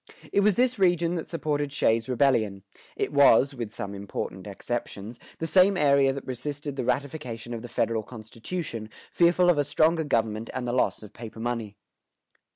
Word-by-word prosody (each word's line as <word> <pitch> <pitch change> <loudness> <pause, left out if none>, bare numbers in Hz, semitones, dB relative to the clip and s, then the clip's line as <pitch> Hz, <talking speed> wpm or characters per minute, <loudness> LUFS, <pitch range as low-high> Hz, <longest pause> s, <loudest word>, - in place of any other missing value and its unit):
It - - +4
was 205 -1 +4
this 250 -2 +1
region 175 -2 +3
that 170 -2 -4
supported 145 -3 -2
Shays' 115 -4 +1
Rebellion; 115 -7 +1 0.3
it - - -2
was 140 -1 +6
(with 120 -5 -5
some 100 -1 -6
important 100 -1 -6
exceptions) 110 +1 -5 0.2
the 165 - -3
same 185 +3 +4
area 140 -3 +4
that 135 +1 -6
resisted 140 +3 -5
the 130 - -2
ratification 125 -3 -3
of 115 - -5
the 120 - -7
federal 115 -1 0
constitution, 115 - -6 0.2
fearful 175 +1 +4
of 155 - 0
a - - +3
stronger 160 +3 +2
government 115 -5 -1
and 125 -1 -3
of 120 - -1
the - - 0
loss - - 0
of 105 0 -12
paper 115 -1 -9
money. 115 -3 -3
130 Hz, 175 wpm, -26 LUFS, 115-155 Hz, 0.3 s, was